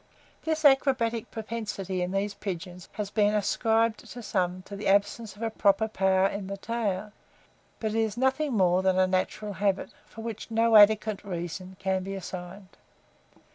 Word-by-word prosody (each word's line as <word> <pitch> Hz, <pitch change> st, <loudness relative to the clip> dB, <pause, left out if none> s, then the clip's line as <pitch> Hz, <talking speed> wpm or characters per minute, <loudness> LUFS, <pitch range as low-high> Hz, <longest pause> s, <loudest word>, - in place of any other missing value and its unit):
This 315 Hz, -1 st, -1 dB
acrobatic 260 Hz, -5 st, +3 dB
propensity 210 Hz, -4 st, -4 dB
in 180 Hz, -, -1 dB
these 195 Hz, +1 st, -1 dB
pigeons 180 Hz, -3 st, -6 dB
has 205 Hz, -2 st, -4 dB
been 210 Hz, 0 st, +2 dB
ascribed 225 Hz, +2 st, +1 dB
by 245 Hz, -, -6 dB
some 185 Hz, -4 st, -1 dB
to 200 Hz, -, -9 dB
the 200 Hz, -, -4 dB
absence 200 Hz, +1 st, +1 dB
of 215 Hz, -, -8 dB
a 225 Hz, -, -1 dB
proper 205 Hz, 0 st, +2 dB
power 190 Hz, -3 st, +2 dB
in 195 Hz, 0 st, -2 dB
the 200 Hz, 0 st, -5 dB
tail; 210 Hz, -2 st, -2 dB, 0.7 s
but 220 Hz, -1 st, -2 dB
is 225 Hz, 0 st, 0 dB
nothing 265 Hz, +3 st, +1 dB
more 180 Hz, -1 st, +4 dB
than 190 Hz, -1 st, +2 dB
a 185 Hz, -, +5 dB
natural 190 Hz, +3 st, -1 dB
habit, 195 Hz, 0 st, 0 dB, 0.2 s
for 225 Hz, -, -10 dB
which 225 Hz, -1 st, -6 dB
no 225 Hz, 0 st, +3 dB
adequate 215 Hz, 0 st, +5 dB
reason 180 Hz, 0 st, -5 dB
can 190 Hz, 0 st, 0 dB
be 195 Hz, +1 st, -5 dB
assigned. 185 Hz, +1 st, -8 dB
205 Hz, 165 wpm, -28 LUFS, 190-225 Hz, 0.7 s, a